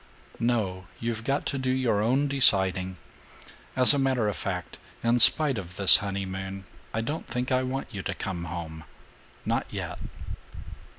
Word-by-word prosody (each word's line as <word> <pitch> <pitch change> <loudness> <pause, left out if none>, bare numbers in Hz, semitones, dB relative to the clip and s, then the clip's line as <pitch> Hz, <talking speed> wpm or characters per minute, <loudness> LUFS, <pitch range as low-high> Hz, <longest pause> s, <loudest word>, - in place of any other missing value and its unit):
"No. 105 -6 -1
You've 115 -1 -3
got 135 +4 -1
to 140 - -2
do 130 0 -2
your 130 -5 +1
own 130 +6 +2
deciding. 95 -9 +2 0.8
As 130 +2 +6
a 140 - +1
matter 130 -5 +1
of 105 - -1
fact, 90 -2 -5 0.2
in 120 +1 +3
spite 140 0 +6
of 90 -2 -9
this 95 0 +8
honeymoon, 95 -1 -5 0.3
I 110 - -2
don't 150 +8 -4
think 125 +1 -3
I 130 0 +3
want 130 +1 -4
you 100 - -4
to - - -4
come 90 -4 -4
home. 80 -1 -7 0.6
Not - - -1
yet." - - -6
110 Hz, 160 wpm, -27 LUFS, 95-130 Hz, 0.8 s, this